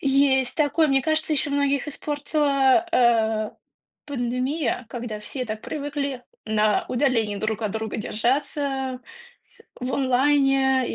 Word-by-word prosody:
Есть 270 Hz, -2 st, +3 dB
такое, 305 Hz, +1 st, +2 dB
мне 270 Hz, -1 st, +2 dB
кажется, 315 Hz, +1 st, 0 dB
ещё 290 Hz, -1 st, 0 dB
многих 280 Hz, 0 st, 0 dB
испортила, 290 Hz, +1 st, +1 dB
э, 225 Hz, -5 st, +2 dB, 0.5 s
пандемия, 255 Hz, 0 st, -2 dB
когда 230 Hz, -3 st, -5 dB
все 250 Hz, +5 st, -4 dB
так 215 Hz, -2 st, -5 dB
привыкли 285 Hz, -3 st, -4 dB, 0.2 s
на 215 Hz, -1 st, +1 dB
удалении 235 Hz, -5 st, +1 dB
друг 215 Hz, +2 st, -2 dB
от 210 Hz, -2 st, -1 dB
друга 220 Hz, -1 st, -3 dB
держаться, 265 Hz, +3 st, -1 dB, 0.8 s
в 250 Hz, +1 st, -3 dB
онлайне 270 Hz, 0 st, +2 dB
265 Hz, 115 wpm, -24 LUFS, 235-285 Hz, 0.8 s, Есть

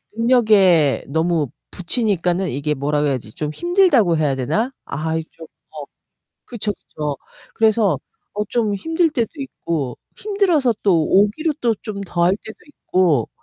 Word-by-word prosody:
능력에 210 Hz, -, +4 dB
너무 160 Hz, +1 st, 0 dB, 0.2 s
부치니까는 185 Hz, -3 st, 0 dB
이게 145 Hz, +3 st, -2 dB
뭐라고 145 Hz, +1 st, 0 dB
해야지? 125 Hz, -6 st, -3 dB
좀 150 Hz, -1 st, -4 dB
힘들다고 345 Hz, -, +3 dB
해야 145 Hz, -3 st, +1 dB
되나? 160 Hz, -, -1 dB
아이 160 Hz, +2 st, -3 dB
좀 165 Hz, -1 st, -12 dB, 0.3 s
어 -, -, -7 dB, 0.6 s
그쵸, 215 Hz, -4 st, -3 dB
그쵸. 150 Hz, -6 st, -6 dB, 0.4 s
그래서 215 Hz, -, +2 dB, 0.4 s
어 210 Hz, -, -1 dB
좀 220 Hz, -4 st, 0 dB
힘들 325 Hz, -, +1 dB
때도 240 Hz, -7 st, -1 dB
있고 165 Hz, -, -4 dB, 0.2 s
힘들어서 360 Hz, -, +1 dB
또 175 Hz, -6 st, +3 dB
오기로 210 Hz, -, +2 dB
또 235 Hz, -2 st, +2 dB
좀 200 Hz, -1 st, -7 dB
더 175 Hz, -2 st, -2 dB
할 185 Hz, +3 st, +3 dB
때도 220 Hz, 0 st, -12 dB
있고 180 Hz, -, 0 dB
190 Hz, 275 characters per minute, -20 LUFS, 155-235 Hz, 0.6 s, 능력에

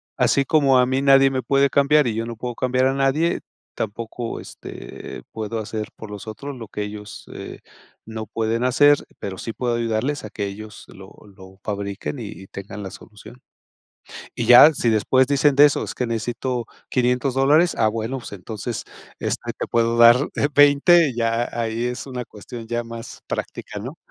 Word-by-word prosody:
así 140 Hz, -1 st, +2 dB
como 140 Hz, -4 st, +4 dB
a 125 Hz, -, +5 dB
mí 130 Hz, +1 st, 0 dB
nadie 135 Hz, 0 st, +6 dB
me 130 Hz, -1 st, -2 dB
puede 140 Hz, 0 st, +3 dB
cambiar, 140 Hz, 0 st, +4 dB
y 110 Hz, -, -1 dB
yo 115 Hz, +1 st, -2 dB
no 115 Hz, -1 st, -7 dB
puedo 120 Hz, 0 st, -5 dB
cambiar 130 Hz, 0 st, +1 dB
a 135 Hz, -, +2 dB
nadie, 140 Hz, +5 st, +1 dB, 0.3 s
tampoco, 115 Hz, +2 st, -5 dB
este, -, -, -9 dB
puedo 110 Hz, 0 st, -4 dB
hacer 110 Hz, 0 st, -5 dB
por 110 Hz, -, -9 dB
los 105 Hz, +1 st, -8 dB
otros 140 Hz, +6 st, -7 dB
lo 115 Hz, -2 st, -8 dB
que 105 Hz, -, -5 dB
ellos, 105 Hz, 0 st, -7 dB
eh, -, -, -8 dB, 0.5 s
no 110 Hz, 0 st, -6 dB
pueden 115 Hz, +2 st, -1 dB
hacer, 145 Hz, +3 st, +4 dB
pero 95 Hz, -2 st, -5 dB
sí 115 Hz, +4 st, -5 dB
puedo 120 Hz, -2 st, -1 dB
ayudarles 115 Hz, +5 st, -1 dB
a -, -, -7 dB
que 100 Hz, -, -4 dB
ellos 105 Hz, +1 st, -9 dB
lo 95 Hz, 0 st, -13 dB, 0.2 s
lo 95 Hz, 0 st, -15 dB
fabriquen 100 Hz, +5 st, -4 dB
y 110 Hz, -, -6 dB
y 95 Hz, -1 st, -11 dB
tengan 100 Hz, +1 st, -8 dB
la 95 Hz, -, -5 dB
solución. 110 Hz, +5 st, -14 dB, 1.0 s
Y 115 Hz, -, -2 dB
ya, 125 Hz, +6 st, +9 dB
si 120 Hz, -, -1 dB
después 130 Hz, +4 st, +3 dB
dicen 140 Hz, +1 st, +3 dB
de 145 Hz, +1 st, +9 dB
eso: 145 Hz, -, 0 dB
"Es -, -, -6 dB
que 125 Hz, -, -2 dB
necesito 120 Hz, +2 st, -2 dB, 0.2 s
$500 125 Hz, +1 st, +1 dB
dólares". 150 Hz, +6 st, +4 dB
Ah, 110 Hz, -, +4 dB
bueno, 115 Hz, +4 st, -3 dB
pues, 120 Hz, -, -10 dB
entonces, 100 Hz, +1 st, -6 dB, 0.3 s
este, -, -, -3 dB
te -, -, -5 dB
puedo 115 Hz, 0 st, +1 dB
dar 120 Hz, +1 st, +9 dB, 0.4 s
$20 145 Hz, +3 st, +6 dB
y 120 Hz, -, -4 dB
ahí 115 Hz, 0 st, -1 dB
es 125 Hz, +2 st, -4 dB
una 125 Hz, -2 st, -5 dB
cuestión 115 Hz, +2 st, -10 dB
ya 120 Hz, 0 st, -2 dB
más 115 Hz, 0 st, -9 dB
práctica, 105 Hz, -, -5 dB
¿no? 130 Hz, +9 st, -7 dB
120 Hz, 185 wpm, -22 LUFS, 110-135 Hz, 1.0 s, ya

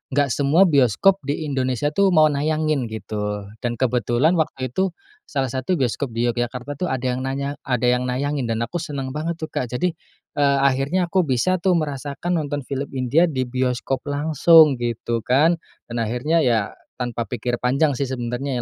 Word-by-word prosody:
nggak 145 Hz, -2 st, +2 dB
semua 145 Hz, +8 st, +4 dB
bioskop 150 Hz, -, +3 dB
di 145 Hz, +3 st, -2 dB
Indonesia 135 Hz, -1 st, -1 dB
tuh 200 Hz, +5 st, +3 dB
mau 155 Hz, -1 st, +6 dB
nayangin 155 Hz, -2 st, 0 dB
gitu, 105 Hz, -2 st, -4 dB, 0.2 s
dan 120 Hz, -1 st, -2 dB
kebetulan 125 Hz, -, +1 dB
waktu 130 Hz, -5 st, -2 dB
itu 190 Hz, +7 st, -1 dB, 0.3 s
salah 135 Hz, -3 st, -2 dB
satu 130 Hz, +8 st, -1 dB
bioskop 130 Hz, -3 st, -2 dB
di 115 Hz, -, 0 dB
Yogyakarta 125 Hz, +4 st, -4 dB
tuh 180 Hz, -, -1 dB
ada 130 Hz, -5 st, -3 dB
yang 125 Hz, 0 st, 0 dB
nanya 140 Hz, +2 st, -3 dB
ada 125 Hz, -3 st, 0 dB
yang 125 Hz, +1 st, +2 dB
nayangin 135 Hz, +1 st, -1 dB
dan 115 Hz, 0 st, -1 dB
aku 175 Hz, +9 st, -3 dB
seneng 140 Hz, -5 st, -4 dB
banget 155 Hz, +4 st, -3 dB
tuh 160 Hz, -1 st, -7 dB
Kak 125 Hz, -, -2 dB
jadi, 125 Hz, +10 st, -1 dB, 0.5 s
eee, 140 Hz, -1 st, +3 dB
akhirnya 140 Hz, +7 st, +1 dB
aku 185 Hz, -4 st, +2 dB
bisa 160 Hz, +9 st, +1 dB
tuh 185 Hz, 0 st, +2 dB
merasakan 150 Hz, +2 st, -2 dB
nonton 145 Hz, -2 st, -3 dB
film 140 Hz, +1 st, -4 dB
India 135 Hz, +7 st, +3 dB
di 135 Hz, -5 st, -1 dB
bioskop 130 Hz, +1 st, -1 dB
langsung 150 Hz, 0 st, +5 dB
gitu 120 Hz, -1 st, -2 dB
kan, 150 Hz, +9 st, +2 dB, 0.3 s
dan 120 Hz, -, -2 dB
akhirnya 125 Hz, +9 st, 0 dB
ya 115 Hz, -8 st, +1 dB, 0.2 s
tanpa 120 Hz, -2 st, -3 dB
pikir 120 Hz, +2 st, -3 dB
panjang 140 Hz, +5 st, +2 dB
sih 140 Hz, +1 st, -2 dB
sebenarnya 125 Hz, +1 st, -3 dB
135 Hz, 175 wpm, -22 LUFS, 125-155 Hz, 0.5 s, mau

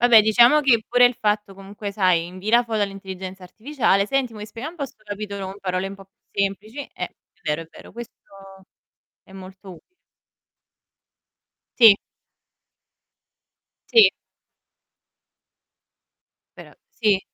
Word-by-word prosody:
Vabbè, 235 Hz, -3 st, +7 dB
diciamo 235 Hz, +7 st, +5 dB
che 235 Hz, -5 st, +3 dB
pure 245 Hz, 0 st, +5 dB
il 245 Hz, -, +5 dB
fatto 210 Hz, -1 st, -1 dB
comunque, 200 Hz, +1 st, -8 dB
sai, 185 Hz, -4 st, +2 dB
invii 185 Hz, +4 st, -9 dB
la 240 Hz, +1 st, +4 dB
foto 220 Hz, -2 st, -2 dB
all'intelligenza 190 Hz, -1 st, -6 dB
artificiale, 215 Hz, -1 st, 0 dB
"Senti 265 Hz, -1 st, -1 dB
mi 210 Hz, -1 st, -8 dB
spieghi 230 Hz, +7 st, -7 dB
un 335 Hz, -, -11 dB
po' 280 Hz, -, -3 dB
sto 230 Hz, -, -21 dB
capitolo 205 Hz, -1 st, -6 dB
con 190 Hz, +1 st, -8 dB
parole 185 Hz, 0 st, -2 dB
un 200 Hz, -, -8 dB
po' 195 Hz, -1 st, -15 dB
più 195 Hz, +1 st, -8 dB
semplici." 205 Hz, +6 st, -4 dB, 0.2 s
Eh, -, -, -4 dB
è -, -, -10 dB, 0.3 s
vero, 150 Hz, +1 st, -2 dB
è 165 Hz, -, -14 dB
vero, -, -, -15 dB
questo 235 Hz, 0 st, -9 dB, 1.1 s
è 190 Hz, -, -19 dB
molto 190 Hz, 0 st, -12 dB
utile. 165 Hz, -, -15 dB, 2.0 s
Sì. 225 Hz, -5 st, +9 dB, 1.9 s
Sì. 450 Hz, -3 st, +7 dB, 2.5 s
Però -, -, -13 dB, 0.2 s
sì. 210 Hz, -4 st, +1 dB
205 Hz, 135 wpm, -22 LUFS, 195-235 Hz, 2.5 s, Sì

